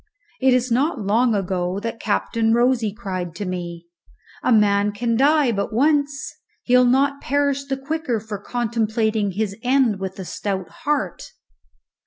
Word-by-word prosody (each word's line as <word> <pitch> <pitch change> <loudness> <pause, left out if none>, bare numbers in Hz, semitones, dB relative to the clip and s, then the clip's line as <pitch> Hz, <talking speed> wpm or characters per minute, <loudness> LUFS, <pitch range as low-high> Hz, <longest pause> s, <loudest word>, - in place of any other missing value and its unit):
It 260 -1 +4
is 250 0 0
not 270 +2 +1
long 225 +3 +3
ago 185 -1 -1
that 230 +1 -5
Captain 225 +1 +1
Rosy 240 -3 +2
cried 185 -5 -5
to 205 - -4
me, 175 -2 -5 0.6
"_A - - +2
man 205 -2 +3
can 230 +2 -1
die 285 +1 +4
but 200 0 -2
once. 285 +3 0 0.3
He'll 250 0 +4
not 275 +3 +2
perish 280 0 0
the 270 -1 -2
quicker 270 -4 -2
for 210 -1 -6
contemplating 220 -2 -1
his 205 0 -2
end 250 -5 +2
with 190 0 -5
a 190 - -6
stout 190 -1 -4 0.2
heart. 265 - -2
230 Hz, 150 wpm, -22 LUFS, 200-265 Hz, 0.6 s, It